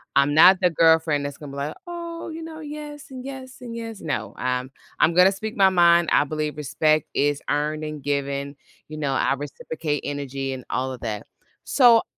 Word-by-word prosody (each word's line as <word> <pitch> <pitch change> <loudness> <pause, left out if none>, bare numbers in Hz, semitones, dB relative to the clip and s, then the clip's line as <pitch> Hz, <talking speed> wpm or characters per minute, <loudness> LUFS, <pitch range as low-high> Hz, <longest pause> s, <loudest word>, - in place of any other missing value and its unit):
I'm 140 +1 +4
not 185 +5 +8
the 180 - +4
girlfriend 160 -3 +3
that's 140 -1 -5
gonna 145 -2 -9
be 140 - -7
like, 145 +2 -3
"Oh," 340 -1 -6
you 325 0 -7
know, 320 -1 -8
"Yes 295 -1 -8
and 255 -1 -7
yes 265 -1 -8
and 235 -2 -7
yes." 225 -2 -6
No. 150 - -3
I 125 0 0
I'm 130 +1 -9 0.3
I'm 170 - +4
gonna 180 +2 +6
speak 215 +2 -6
my 195 -1 +6
mind, 170 -2 +5
I - - +5
believe 150 0 -3
respect 155 +1 +1
is 145 0 +1
earned 150 +1 -1
and 150 -1 -5
given. 140 0 -2 0.3
You 155 - -7
know, 145 -3 -1
I 135 - +2
reciprocate 145 +1 -4
energy 135 -1 -3
and 130 - -7
all 130 +1 -1
of 125 - -10
that. 110 -2 -4 0.4
So 240 -4 +6
155 Hz, 200 wpm, -24 LUFS, 140-220 Hz, 0.4 s, not